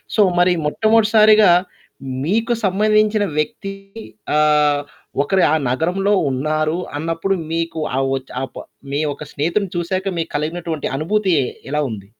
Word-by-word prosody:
So, 215 Hz, -, +4 dB, 0.2 s
మరి 180 Hz, 0 st, +4 dB
మొట్టమొదటిసారిగా, 215 Hz, +2 st, +5 dB, 0.7 s
మీకు 225 Hz, +7 st, +1 dB
సంబంధించిన 215 Hz, +2 st, +2 dB
వ్యక్తి 195 Hz, +5 st, -2 dB, 0.6 s
ఆహ్, 150 Hz, -1 st, +3 dB, 0.4 s
ఒకరు 185 Hz, +5 st, +2 dB
ఆ -, -, +4 dB
నగరంలో 180 Hz, +10 st, 0 dB, 0.2 s
ఉన్నారు 155 Hz, +4 st, -1 dB, 0.2 s
అన్నప్పుడు, 165 Hz, +4 st, -1 dB, 0.2 s
మీకు 165 Hz, -1 st, -2 dB, 0.2 s
ఆ -, -, +2 dB, 0.2 s
ఒచ్ 130 Hz, -, -11 dB
ఆపా 135 Hz, -, -7 dB, 0.3 s
మీ 145 Hz, -, 0 dB
ఒక్క -, -, -9 dB
స్నేహితుడిని 170 Hz, +6 st, -1 dB
చూసాక 185 Hz, +2 st, -2 dB
మీకు 165 Hz, -, -3 dB
కలిగినటువంటి 160 Hz, 0 st, -3 dB
అనుభూతి 190 Hz, +3 st, +1 dB, 0.4 s
ఎలా 150 Hz, 0 st, +1 dB
ఉంది? 100 Hz, -3 st, -8 dB
175 Hz, 125 wpm, -19 LUFS, 150-205 Hz, 0.7 s, మొట్టమొదటిసారిగా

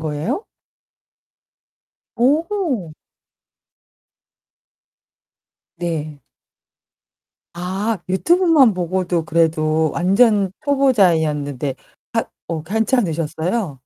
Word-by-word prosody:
거예요? 160 Hz, -, -3 dB, 1.7 s
오호. 280 Hz, -, 0 dB, 2.8 s
네. 155 Hz, -4 st, -4 dB, 1.4 s
아. 195 Hz, +5 st, -2 dB
유튜브만 310 Hz, -, +4 dB
보고도 180 Hz, -1 st, -1 dB
그래도 160 Hz, -1 st, +1 dB
완전 200 Hz, +2 st, +3 dB
초보자였는데 160 Hz, -, +1 dB, 0.4 s
하 -, -, 0 dB, 0.2 s
어 160 Hz, -2 st, -4 dB
괜찮으셨어요? 175 Hz, -, -1 dB
180 Hz, 145 characters per minute, -19 LUFS, 160-235 Hz, 2.8 s, 유튜브만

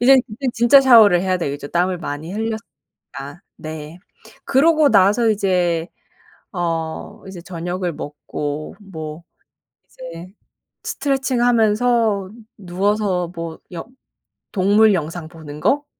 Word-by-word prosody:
이제는 260 Hz, +1 st, +6 dB
그땐 255 Hz, +3 st, -3 dB
진짜 240 Hz, +4 st, +6 dB
샤워를 225 Hz, -9 st, +7 dB
해야 185 Hz, 0 st, 0 dB
되겠죠 145 Hz, -3 st, -4 dB
땀을 180 Hz, +2 st, 0 dB
많이 155 Hz, +2 st, -6 dB
흘렸으니까. 220 Hz, +1 st, -2 dB, 1.0 s
네. 155 Hz, +1 st, -8 dB, 0.5 s
그러고 305 Hz, +2 st, +4 dB
나서 210 Hz, +3 st, +4 dB
이제 180 Hz, -5 st, 0 dB, 0.6 s
어 165 Hz, -3 st, -4 dB
이제 190 Hz, -2 st, -9 dB
저녁을 175 Hz, 0 st, -4 dB
먹고 150 Hz, 0 st, -6 dB
뭐 160 Hz, -4 st, -8 dB, 0.6 s
이제 170 Hz, +2 st, -10 dB, 0.5 s
스트레칭 265 Hz, -3 st, -1 dB
하면서 225 Hz, -3 st, +2 dB, 0.3 s
누워서 190 Hz, -1 st, -1 dB
뭐 165 Hz, -1 st, -6 dB
영 170 Hz, -2 st, -6 dB, 0.7 s
동물 205 Hz, +2 st, +4 dB
영상 165 Hz, -1 st, -3 dB
보는 155 Hz, -3 st, -10 dB
거? 290 Hz, +1 st, +2 dB
185 Hz, 235 characters per minute, -20 LUFS, 165-225 Hz, 1.0 s, 샤워를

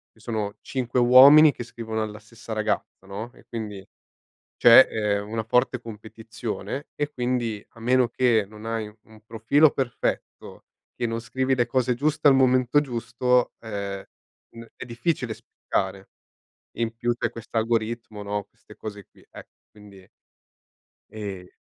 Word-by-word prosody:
i -, -, -24 dB
sono 110 Hz, -3 st, -4 dB
5 125 Hz, -1 st, -2 dB
uomini 140 Hz, +5 st, +8 dB
che 120 Hz, -, -7 dB
scrivono 110 Hz, -2 st, -5 dB
alla 105 Hz, 0 st, -7 dB
stessa 115 Hz, +1 st, -10 dB
ragazza, 110 Hz, -2 st, -3 dB
no, 110 Hz, +5 st, -7 dB
e -, -, -20 dB
quindi 105 Hz, -4 st, -7 dB, 0.7 s
c'è, 120 Hz, +3 st, +8 dB
ehm, 105 Hz, -1 st, -1 dB
una 110 Hz, 0 st, -2 dB
forte 125 Hz, +2 st, +1 dB
competizione; 110 Hz, +4 st, -7 dB
e 145 Hz, 0 st, -2 dB
quindi, 120 Hz, -4 st, -2 dB
a 115 Hz, -, -16 dB
meno 125 Hz, +1 st, +3 dB
che 115 Hz, -3 st, +2 dB
non 105 Hz, 0 st, -13 dB
hai 115 Hz, -1 st, -3 dB
u 105 Hz, -, -18 dB
un 110 Hz, -1 st, -18 dB
profilo 115 Hz, +8 st, +3 dB
perfetto, 130 Hz, -3 st, -4 dB, 0.3 s
che 120 Hz, -, -1 dB
non 115 Hz, 0 st, -3 dB
scrivi 130 Hz, +3 st, -1 dB
le 120 Hz, -, +2 dB
cose 125 Hz, +1 st, +1 dB
giuste 150 Hz, +4 st, -1 dB
al 135 Hz, -, +6 dB
momento 130 Hz, +1 st, +3 dB
giusto, 125 Hz, -1 st, 0 dB
ehm, 100 Hz, -3 st, -5 dB, 0.5 s
n 115 Hz, -, -10 dB
è -, -, -7 dB
difficile 120 Hz, -1 st, -2 dB
spiccare. 95 Hz, 0 st, -4 dB, 0.6 s
E -, -, -10 dB
in 115 Hz, 0 st, -2 dB
più 120 Hz, +1 st, 0 dB
c'è 120 Hz, -, -2 dB
questo 115 Hz, 0 st, -5 dB
algoritmo, 115 Hz, -1 st, -2 dB
no, 100 Hz, 0 st, -3 dB
queste -, -, -19 dB
cose 105 Hz, -2 st, -8 dB
qui. -, -, -24 dB
Ec -, -, -12 dB, 0.2 s
quindi 100 Hz, -3 st, -16 dB, 1.0 s
e 100 Hz, -4 st, -7 dB
115 Hz, 155 wpm, -24 LUFS, 105-125 Hz, 1.0 s, uomini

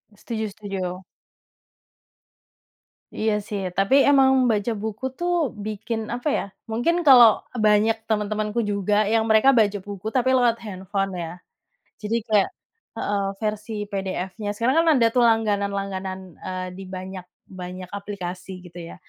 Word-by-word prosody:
Setuju 220 Hz, +1 st, -4 dB
setuju. 190 Hz, -3 st, -5 dB, 2.1 s
Iya 220 Hz, 0 st, +1 dB
sih, 205 Hz, -2 st, -3 dB, 0.2 s
tapi 195 Hz, +7 st, +3 dB
emang 270 Hz, -2 st, +6 dB, 0.2 s
baca 210 Hz, +2 st, 0 dB
buku 220 Hz, +3 st, -4 dB
tuh 350 Hz, 0 st, 0 dB, 0.3 s
bikin, 215 Hz, +2 st, -3 dB, 0.2 s
apa 245 Hz, +5 st, -5 dB
ya, -, -, -2 dB, 0.3 s
mungkin 240 Hz, +10 st, +1 dB
kalau 240 Hz, -5 st, +8 dB, 0.3 s
banyak 215 Hz, +1 st, +4 dB
teman-temanku 215 Hz, +1 st, -1 dB
juga 205 Hz, +1 st, +1 dB
yang 225 Hz, -1 st, +3 dB
mereka 220 Hz, +5 st, +6 dB
baca 205 Hz, -3 st, +3 dB
buku 200 Hz, -1 st, -8 dB
tapi 260 Hz, 0 st, +3 dB
lewat 240 Hz, -2 st, +3 dB
handphone 195 Hz, 0 st, -3 dB
ya. 165 Hz, -, -5 dB, 0.7 s
Jadi 210 Hz, +2 st, -1 dB
kayak 210 Hz, -3 st, +3 dB, 0.5 s
heeh, 205 Hz, -1 st, -1 dB, 0.2 s
versi 215 Hz, +1 st, -3 dB, 0.2 s
PDF-nya. 195 Hz, +1 st, -3 dB
Sekarang 255 Hz, +5 st, +2 dB
kan 335 Hz, -, -1 dB
ada 235 Hz, -, +4 dB
tuh 250 Hz, -, +3 dB
langganan-langganan, 200 Hz, -3 st, -1 dB, 0.3 s
eee, 185 Hz, 0 st, -3 dB
di 195 Hz, -, -7 dB
banyak 185 Hz, 0 st, -7 dB, 0.2 s
banyak 185 Hz, 0 st, -8 dB
aplikasi 195 Hz, -2 st, -6 dB
gitu 175 Hz, 0 st, -11 dB
ya. -, -, -10 dB
210 Hz, 130 wpm, -23 LUFS, 195-225 Hz, 2.1 s, kalau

